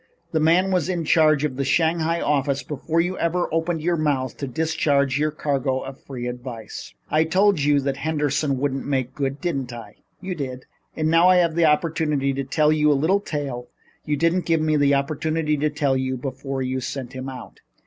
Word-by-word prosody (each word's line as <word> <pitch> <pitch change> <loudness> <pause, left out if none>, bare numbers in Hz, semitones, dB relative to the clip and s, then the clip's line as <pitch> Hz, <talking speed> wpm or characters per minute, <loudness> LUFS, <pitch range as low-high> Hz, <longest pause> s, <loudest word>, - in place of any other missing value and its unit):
The 160 - +1
man 170 +5 +3
was 180 -2 +1
in 175 -3 -1
charge 155 -2 +4
of 135 -4 -2
the 140 - 0
Shanghai 165 +3 +1
office 140 -2 0
before 155 +3 -2
you 180 +2 0
ever 175 +1 0
opened 165 -1 -1
your 170 0 +1
mouth 140 -5 0
to 140 - -4
discharge 140 -1 +1
your 155 +1 +2
cargo 135 -3 -1
of 135 0 -9
free 125 -3 -7
advice." 120 -3 -7 0.2
"I 155 +1 +4
told 190 +3 +3
you 145 +1 +3
then 140 - -1
that 135 -1 -1
Henderson 150 -1 0
wouldn't 135 0 -2
make 130 -2 -1
good, 140 0 -2
didn't 135 -8 -2
I?" 120 -1 -10 0.2
"You 185 0 -4
did." 130 -5 -6 0.3
"And 155 0 +1
now 170 +2 +6
I 185 - +6
have 170 -3 +3
an 170 -1 +4
opportunity 150 -3 +1
to 135 +1 -2
tell 150 +3 +2
you 150 -1 +3
the 145 - +4
little 165 +8 +2
tale 140 -9 -4 0.4
you 150 -1 -1
didn't 165 +4 +1
give 165 -1 +3
me 155 0 +1
an 145 -2 +3
opportunity 150 +2 0
to 150 +2 +1
tell 145 -3 0
you 130 0 -1
before 135 +1 -4
you 130 0 -2
sent 130 0 -5
him 130 +1 -5
out. 130 -1 -10
150 Hz, 205 wpm, -23 LUFS, 135-160 Hz, 0.4 s, now